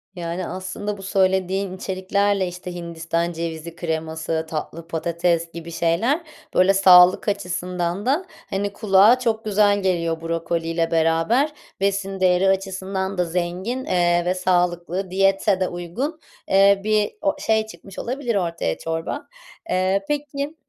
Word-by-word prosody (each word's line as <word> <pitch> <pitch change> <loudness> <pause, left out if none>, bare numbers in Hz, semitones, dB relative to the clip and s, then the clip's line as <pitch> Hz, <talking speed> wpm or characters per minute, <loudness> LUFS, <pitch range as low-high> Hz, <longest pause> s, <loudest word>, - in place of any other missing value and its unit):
Yani, 170 +1 -4
aslında 190 +3 -5
bu - - -10
söylediğin 190 0 +1
içeriklerle, 195 +1 0
işte, 180 0 -7
Hindistan 170 0 -2
cevizi 165 0 -5
kreması, 160 -1 -3
tatlı 165 +1 -5
patates 170 0 0
gibi 170 0 -8
şeyler, 180 - +1 0.3
böyle, 185 +2 +5
sağlık 185 -1 +7
açısından 180 -1 -2
da, 290 +9 +1 0.2
hani, 200 +1 -2
kulağa 210 +4 +5
çok 225 -3 -1
güzel 205 -1 +3
geliyor 170 -3 0
brokoliyle 165 0 -1
beraber. 165 - +2 0.3
Besin 195 0 -1
değeri 185 +1 +3
açısından 190 0 -2
da 180 - +2
zengin, 180 +9 -3
eee, 175 -1 +2
ve 180 - +2
sağlıklı, 180 0 0
diyete 195 +1 +2
de 185 - +1
uygun, 215 - -4 0.3
eee, 195 +1 +5
bir 215 -1 +1
o 195 - +1
şey 220 0 +1
çıkmış 195 -3 -11
olabilir 245 -2 -2
ortaya, 170 - -1
çorba. 165 - -4 0.4
Eee, 190 +1 +1
peki, 290 0 -3
185 Hz, 130 wpm, -22 LUFS, 170-200 Hz, 0.4 s, sağlık